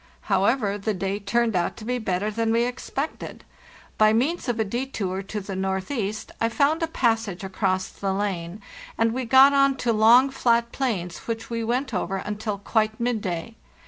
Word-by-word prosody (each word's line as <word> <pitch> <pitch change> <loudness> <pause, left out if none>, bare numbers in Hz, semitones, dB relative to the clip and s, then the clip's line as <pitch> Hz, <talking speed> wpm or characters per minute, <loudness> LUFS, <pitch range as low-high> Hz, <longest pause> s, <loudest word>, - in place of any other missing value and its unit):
However, 205 +1 +1
the 210 +1 -1
day 195 +2 -2
turned 225 +2 0
out 175 -1 0
to 215 - -9
be 250 +1 -1
better 205 -1 -1
than 225 +1 0
we 230 +1 +3
expected. 270 +4 -5 0.6
By 215 0 +6
means 270 +6 0
of 235 -2 -1
a - - +3
detour 210 -4 -3
to 205 +2 -5
the 195 -1 -6
northeast 195 +3 -3
I 230 - +2
found 290 +6 +2
a 330 - +1
passage 225 - 0
across 190 -1 -1
the 195 -1 -3
lane, 190 -1 -3 0.3
and 225 0 +2
we 255 0 -2
got 265 +4 +7
on 275 -1 +3
to 235 -3 0
long, 235 +5 +6
flat 235 -3 +1
plains 195 -10 -2
which 230 0 -4
we 230 0 -2
went 250 +3 -1
over 195 0 -1
until 210 +1 -4
quite 215 +1 0
midday. 220 -5 -2
220 Hz, 175 wpm, -24 LUFS, 195-245 Hz, 0.6 s, got